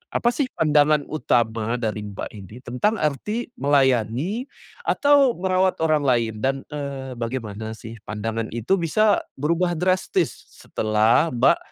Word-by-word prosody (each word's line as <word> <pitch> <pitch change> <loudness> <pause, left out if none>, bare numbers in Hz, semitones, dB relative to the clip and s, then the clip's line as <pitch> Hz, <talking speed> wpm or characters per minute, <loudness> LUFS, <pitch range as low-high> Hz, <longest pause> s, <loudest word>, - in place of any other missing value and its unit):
apa 240 - +3
sih 265 +2 0
pandangan 150 -1 +3
utama 115 -6 0
dari 105 -1 -2
Mbak 100 -1 -6
ini 105 0 -11
tentang 125 - 0
arti 210 - -2
melayani 140 - +1 0.4
atau 285 -3 +4
merawat 185 +1 +1
orang 155 -2 +2
lain? 120 -4 +2
Dan, 135 0 0
eee, 140 -3 -5
bagaimana 110 -3 -4
sih 110 +1 -10
pandangan 110 +1 -3
itu 120 - +1
bisa 205 +6 +3 0.2
berubah 170 +5 0
drastis 185 +3 +1 0.2
s - - -18
setelah 110 +8 +2
Mbak 125 +7 +4
135 Hz, 135 wpm, -23 LUFS, 115-175 Hz, 0.4 s, atau